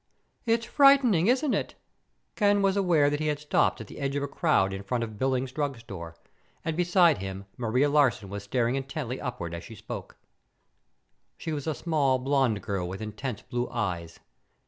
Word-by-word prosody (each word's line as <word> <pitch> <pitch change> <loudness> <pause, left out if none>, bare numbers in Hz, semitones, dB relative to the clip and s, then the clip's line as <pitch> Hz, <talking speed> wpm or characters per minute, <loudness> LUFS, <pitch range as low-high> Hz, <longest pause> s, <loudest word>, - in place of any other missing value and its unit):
"It's 230 0 +2
frightening, 270 - +5
isn't 265 +4 +2
it?" - - -2 0.6
Ken 205 -2 +3
was 195 0 +3
aware 170 -7 +3
that 145 - -1
he 155 - -1
had 150 -1 +1
stopped 150 0 +1
at - - -7
the - - -11
edge 140 0 -2
of 140 - -1
a - - -1
crowd 140 - +2
in 95 - -5
front 115 +4 -2
of 110 -2 -7
Billings 130 -1 0
Drugstore, 115 - -5 0.5
and 165 -1 -1
beside 175 - +4
him 95 +1 -6
Maria 125 +4 +1
Larsen 140 -8 +2
was 100 +1 -5
staring 120 +3 0
intently 135 -2 -4
upward 100 - -4
as 85 +1 -6
she 115 - -10
spoke. 105 +1 -8 1.2
She 160 - -4
was 145 0 -4
a 155 - 0
small, 145 -6 +1
blonde 130 -6 +1
girl 95 -4 -2
with 95 - -6
intense 110 +2 -5
blue 120 0 -3
eyes. 90 -8 -3
135 Hz, 180 wpm, -27 LUFS, 105-155 Hz, 1.2 s, frightening